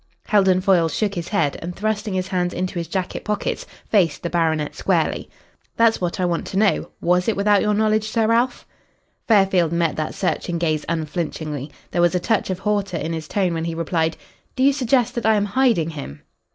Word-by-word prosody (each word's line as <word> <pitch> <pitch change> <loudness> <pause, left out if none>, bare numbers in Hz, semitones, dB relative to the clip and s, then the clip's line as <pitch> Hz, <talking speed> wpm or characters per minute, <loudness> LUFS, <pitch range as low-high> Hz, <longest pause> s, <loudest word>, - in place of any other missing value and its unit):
Heldon 190 -3 +3
Foyle 180 -4 +3
shook 205 +4 -1
his 175 -3 -4
head, 160 -9 0
and 175 +1 -6
thrusting 215 -1 -2
his 185 0 -2
hands 180 -1 -1
into 185 -1 -2
his 170 - -4
jacket 190 -2 -3
pockets 210 0 -2 0.2
faced 170 -9 +2
the 170 - -3
baronet 160 -3 0
squarely. - - 0 0.5
"That's 230 -2 +3
what 175 0 -2
I 180 - +2
want 170 -1 -1
to 190 - -4
know. 205 -1 +2
Was 180 +1 +2
it 225 - +2
without 205 0 +3
your 210 -1 +1
knowledge, 215 0 +1
Sir 225 0 +1
Ralph?" 235 +3 +1 0.6
Fairfield 195 -6 +4
met 170 -2 +1
that 155 0 -3
searching 175 -2 -1
gaze 155 -3 0
unflinchingly. 155 -3 -3 0.2
There 175 - +1
was 175 +1 +3
a - - +2
touch 215 +3 0
of 185 - -1
hauteur 200 -2 -1
in 165 - -3
his 160 -1 -5
tone 185 -2 0
when 165 0 -2
he 165 -1 -3
replied, 165 0 -1 0.4
"Do 260 - +1
you 280 +1 +5
suggest 250 -3 +1
that 235 -3 -3
I 220 - +5
am 205 -1 +1
hiding 205 -7 +2
him?" 135 - -8
185 Hz, 205 wpm, -21 LUFS, 165-210 Hz, 0.6 s, you